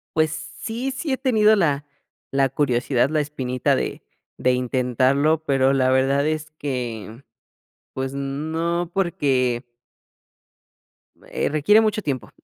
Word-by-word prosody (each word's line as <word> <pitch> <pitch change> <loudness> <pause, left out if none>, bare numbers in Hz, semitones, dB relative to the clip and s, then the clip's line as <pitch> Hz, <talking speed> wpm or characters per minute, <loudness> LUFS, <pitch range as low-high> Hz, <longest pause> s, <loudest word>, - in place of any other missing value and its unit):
Pues 155 -1 +2
sí, 235 +10 -5
sí 280 +2 -4
he 265 - +1
tenido 220 -4 +4
la 145 -5 +1 0.5
la 135 0 +3
curiosidad, 130 -1 +1
la 155 -1 +1
espinita 130 -4 -1
de - - -3 0.4
de 125 0 +2
intentarlo, 130 +5 +1
pero 135 -2 +2
la 130 -1 +2
verdad 135 +2 +2
es 155 0 -2
que, 120 -4 -5 0.7
pues 130 0 -3
no, 160 +5 -2
porque 135 -9 +1 1.7
eh, - - 0
requiere 155 +9 +4
mucho 215 -1 0
tiempo. 135 - -4
140 Hz, 120 wpm, -22 LUFS, 130-160 Hz, 1.7 s, tenido